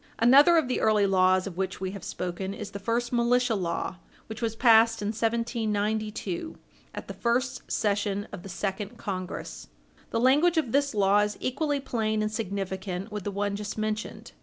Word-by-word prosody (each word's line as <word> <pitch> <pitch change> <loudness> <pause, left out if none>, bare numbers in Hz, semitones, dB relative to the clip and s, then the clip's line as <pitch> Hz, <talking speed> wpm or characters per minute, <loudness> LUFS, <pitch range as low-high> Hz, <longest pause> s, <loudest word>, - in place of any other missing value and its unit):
Another 280 +9 +7
of 315 -5 +2
the 250 - -1
early 215 -2 +4
laws 185 -1 +3
of 185 -3 -7
which 190 0 -2
we 190 0 -3
have 200 -1 -8
spoken 185 +2 -4
is 210 -1 -7
the 200 - -6
first 235 +4 -1
militia 245 0 +2
law, 185 -2 -2 0.3
which 220 +2 -8
was 225 -1 -1
passed 225 -2 +5
in 205 - -1
1792 220 - -2 0.4
at - - -7
the - - -6
first 250 +2 -1
session 205 -1 0
of - - -7
the 195 - -10
second 200 +4 -4
Congress. 185 -4 -5 0.4
The 230 - -1
language 295 +8 +4
of 280 -8 +1
this 280 -2 +1
law 200 0 +4
is 210 0 0
equally 285 +2 -1
plain 220 -5 -1
and 215 - -1
significant 195 -2 -4
with 210 -2 -5
the - - -1
one 200 0 -1
just 205 +1 -5
mentioned. 215 0 -4
215 Hz, 180 wpm, -27 LUFS, 200-235 Hz, 0.4 s, Another